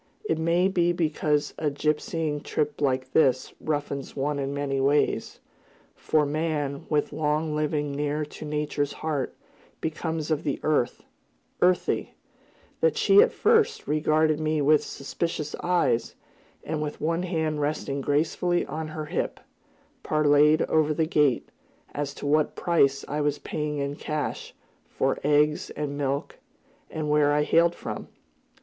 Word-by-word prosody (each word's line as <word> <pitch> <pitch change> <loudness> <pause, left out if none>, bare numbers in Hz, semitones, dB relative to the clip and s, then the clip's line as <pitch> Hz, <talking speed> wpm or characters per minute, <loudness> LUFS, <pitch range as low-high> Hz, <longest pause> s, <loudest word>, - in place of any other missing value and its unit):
It 160 -5 0
may 170 +3 +3
be 175 -2 +2
because 155 -3 0
a 155 - +1
gypsying 150 +1 -1
trip 150 0 -2
like 130 -2 0
this 130 -5 +3
roughens 145 -3 -3
one 145 +1 -1
in 135 0 -2
many 140 -1 -2
ways, 145 +2 +1 0.5
for 155 -1 +1
man, 145 -2 -2
with 150 -2 0
long 155 +1 0
living 150 -1 -1
near 150 +1 -1
to 150 - -10
Nature's 150 -1 -2
heart, 150 -4 -3 0.4
becomes 160 0 -3
of 155 -1 +1
the 145 -3 -2
earth, 150 -5 0 0.6
earthy, 180 0 +1 0.6
that 480 - +2
she 400 +1 +6
at 470 - +4
first 450 0 +2
regarded 155 +1 +2
me 155 0 0
with 150 +1 +4
suspicious 150 +2 -4
eyes, 175 -10 +1 0.5
and, 155 - -3
with 150 -1 -4
one 165 +2 0
hand 160 -4 -1
resting 145 -1 -2
gracefully 160 +5 +1
on 155 +2 -5
her 155 0 -5
hip, - - -3 0.6
parleyed 150 +1 +4
over 155 -1 +2
the 160 - +2
gate, 150 -5 +2 0.4
as 145 -1 -3
to - - -7
what 150 +1 +2
price 140 -6 +2
I 150 +1 -2
was 145 0 +1
paying 150 -1 -3
in 140 +1 -3
cash, 150 -1 -4 0.3
for - - -1
eggs 150 +1 +2
and 145 -1 -4
milk, 140 0 -2 0.5
and 155 -1 -4
where 150 -1 +3
I 150 0 +3
hailed 170 +3 +3
from. - - -6
150 Hz, 145 wpm, -26 LUFS, 145-160 Hz, 0.6 s, she